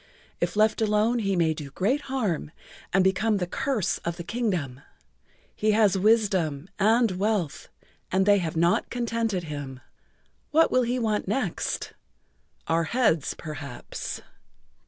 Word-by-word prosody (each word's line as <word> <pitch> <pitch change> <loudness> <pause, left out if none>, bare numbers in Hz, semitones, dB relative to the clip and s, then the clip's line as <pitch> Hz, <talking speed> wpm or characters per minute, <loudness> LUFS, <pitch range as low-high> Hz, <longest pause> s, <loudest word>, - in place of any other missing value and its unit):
If - - -1
left 215 +1 +3
alone 215 +3 +2
he 195 -3 0
may 165 -2 +2
do 150 -2 -7
great 210 - 0
harm 215 - -1 0.4
and 195 0 +4
become 205 +3 +2
the 180 - -1
curse 260 -1 -1
of 170 0 -4
the 170 - -5
Kingdom. 175 - -2 0.7
He 215 0 +2
has 210 -3 +4
wisdom 190 -7 +2
and 225 +2 +4
wealth 190 -4 -1 0.4
and 190 +1 +2
they 205 0 +5
have 165 -3 -3
not 170 +2 +2
contented 230 -5 -1
him. 145 -4 -6 0.7
What 325 +1 +4
will 255 - +4
he 245 +1 0
want 215 -5 -1
next? 255 +8 -2 0.7
Our 165 0 +1
heads, 195 - +1
perhaps." 145 -5 -7
200 Hz, 135 wpm, -26 LUFS, 170-225 Hz, 0.7 s, they